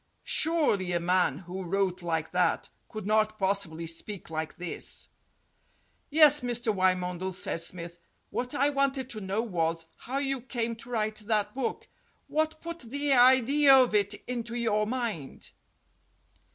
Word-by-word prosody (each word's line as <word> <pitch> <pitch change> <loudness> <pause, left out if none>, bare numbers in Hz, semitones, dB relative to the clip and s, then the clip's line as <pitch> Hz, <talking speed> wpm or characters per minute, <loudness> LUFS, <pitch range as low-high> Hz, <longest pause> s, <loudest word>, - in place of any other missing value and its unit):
Surely 290 - +1
a 175 - +2
man 180 -4 +2
who 180 +2 -7
wrote 185 0 -1
like 160 -2 -2
that 180 -2 +1 0.2
could 215 -3 -7
not 215 +1 +2
possibly 190 -5 -1
speak 170 +3 -5
like 160 0 -4
this. 180 -1 -3 1.0
"Yes, 295 -1 +6
Mr. 240 -2 +1
Wymondel," 185 -1 0
said 175 -2 -1
Smith. 170 0 -3 0.3
"What 250 +3 -3
I 280 +1 +3
wanted 275 -2 0
to 215 - -5
know 195 +3 -1
was 165 -6 -1
how 260 +3 -5
you 275 -2 -1
came 235 -2 -3
to 245 +2 -10
write 215 -2 -1
that 210 -1 -1
book. 260 -1 -3 0.4
What 315 0 -1
put 335 0 -6
the 280 +4 0
idea 260 +3 +6
of 255 -4 +4
it 205 0 +2
into 235 -1 -4
your 215 -3 +1
mind?" 225 - -4
215 Hz, 145 wpm, -28 LUFS, 180-255 Hz, 1.0 s, Yes